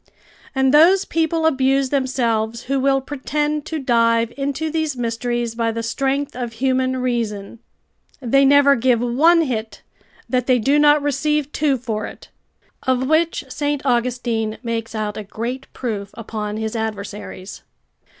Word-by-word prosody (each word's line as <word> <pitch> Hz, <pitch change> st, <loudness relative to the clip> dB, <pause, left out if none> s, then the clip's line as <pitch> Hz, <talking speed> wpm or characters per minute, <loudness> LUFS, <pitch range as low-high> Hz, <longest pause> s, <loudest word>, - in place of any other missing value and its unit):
And 265 Hz, 0 st, +2 dB
those 360 Hz, +6 st, +6 dB
people 325 Hz, 0 st, 0 dB
abuse 270 Hz, -2 st, +2 dB
themselves 235 Hz, -4 st, 0 dB
who 275 Hz, +1 st, -1 dB
will 270 Hz, 0 st, +2 dB
pretend 295 Hz, +2 st, -2 dB
to 320 Hz, -, -3 dB
dive 230 Hz, -3 st, +2 dB
into 285 Hz, +3 st, -2 dB
these 315 Hz, -4 st, -1 dB
mysteries 240 Hz, 0 st, -2 dB
by 230 Hz, 0 st, 0 dB
the 230 Hz, 0 st, -4 dB
strength 270 Hz, +4 st, -1 dB
of 240 Hz, -2 st, -4 dB
human 260 Hz, +2 st, 0 dB
reason. 230 Hz, -4 st, -3 dB, 0.6 s
They 275 Hz, +1 st, +3 dB
never 280 Hz, 0 st, +6 dB
give 245 Hz, -1 st, +2 dB
one 305 Hz, +8 st, +4 dB
hit 225 Hz, -6 st, -4 dB, 0.4 s
that 250 Hz, -1 st, 0 dB
they 255 Hz, -1 st, +4 dB
do 275 Hz, +6 st, +2 dB
not 295 Hz, 0 st, +5 dB
receive 290 Hz, +1 st, 0 dB
two 285 Hz, -3 st, +1 dB
for 225 Hz, -3 st, -4 dB
it; -, -, -12 dB, 0.5 s
of 260 Hz, -1 st, 0 dB
which 315 Hz, 0 st, +1 dB
St. 290 Hz, +1 st, -2 dB
Augustine 235 Hz, -3 st, 0 dB
makes 230 Hz, -1 st, -3 dB
out 210 Hz, -1 st, -3 dB
a 215 Hz, -, -4 dB
great 235 Hz, +6 st, -5 dB
proof 210 Hz, -5 st, -4 dB
upon 215 Hz, -2 st, -5 dB
his 220 Hz, +1 st, -3 dB
adversaries. 205 Hz, -3 st, -6 dB
255 Hz, 145 wpm, -20 LUFS, 230-280 Hz, 0.6 s, those